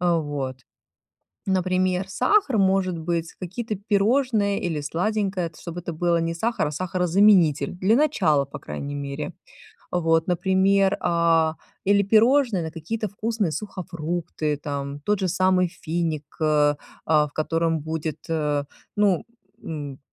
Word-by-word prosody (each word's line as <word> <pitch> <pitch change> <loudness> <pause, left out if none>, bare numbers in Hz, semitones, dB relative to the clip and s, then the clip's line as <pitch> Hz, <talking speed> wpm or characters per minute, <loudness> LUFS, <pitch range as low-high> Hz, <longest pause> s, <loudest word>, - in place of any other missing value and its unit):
Э, 175 -1 +2
вот. 145 -4 -3 0.9
Например, 185 0 +1
сахар 265 - +2
может 190 -2 +2
быть, 165 0 -2
какие-то 210 +5 -4
пирожные 205 +1 +1
или 160 -4 -2
сладенькое, 185 +3 -1
тс 155 - -17
чтобы 170 0 -6
это 175 -1 -5
было 170 +1 +1
не 165 0 -1
сахар, 220 0 -1
а - - -3
сахарозаменитель. 180 -1 +3
Для 190 +5 +2
начала, 200 - +3
по 140 - -9
крайней 145 0 -6
мере. 140 +1 -5 0.6
Вот, 165 -1 +2
например, 190 +2 +3
а, 165 -2 +2 0.3
или 200 +1 +4
пирожные 225 0 +4
на 160 - -4
какие-то 180 +8 -4
вкусные 215 -1 -1
сухофрукты 165 -4 -3
там, 140 -1 -5
тот 205 +7 0
же 190 - 0
самый 185 0 +2
финик, 165 -3 -3 0.2
э, 150 -1 +3 0.3
а, 150 -1 +4
в - - -22
котором 165 +1 0
будет, 160 0 -4
э, 150 -3 0 0.3
ну, 205 -4 +2 0.4
м, 145 -4 -6
175 Hz, 135 wpm, -24 LUFS, 155-195 Hz, 0.9 s, или